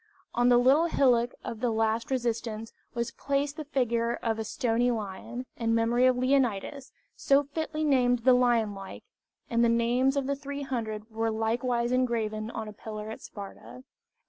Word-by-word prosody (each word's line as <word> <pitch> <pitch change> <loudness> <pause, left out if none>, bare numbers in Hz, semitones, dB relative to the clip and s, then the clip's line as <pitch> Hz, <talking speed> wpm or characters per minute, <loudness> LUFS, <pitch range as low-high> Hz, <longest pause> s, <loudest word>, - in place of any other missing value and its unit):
On 245 +1 +3
the 245 - +6
little 270 +7 +5
hillock 245 -6 +2
of 225 - -5
the 245 +1 +1
last 225 0 0
resistance 230 -3 -2 0.2
was 235 0 -2
placed 280 +3 -1
the 310 - -5
figure 235 -4 0
of 225 -2 -2
a - - -1
stone 235 +2 0
lion, 230 +2 -4
in 230 -1 +1
memory 235 +2 +3
of 255 -1 +3
Leonidas, 255 0 0 0.2
so 280 +1 +3
fitly 310 +2 -3
named 245 -5 +3
the 260 - +7
lion 240 -4 +3
like, 195 -1 -9 0.4
and 235 0 +2
the 235 - +4
names 245 +4 +2
of 275 - 0
the 280 +1 0
300 255 -6 -5
were 225 +1 -1
likewise 235 +2 0
engraven 225 -4 0
on 220 - -5
a 210 - -8
pillar 215 0 -7
at - - -8
Sparta. 125 - -10
235 Hz, 170 wpm, -28 LUFS, 225-255 Hz, 0.4 s, the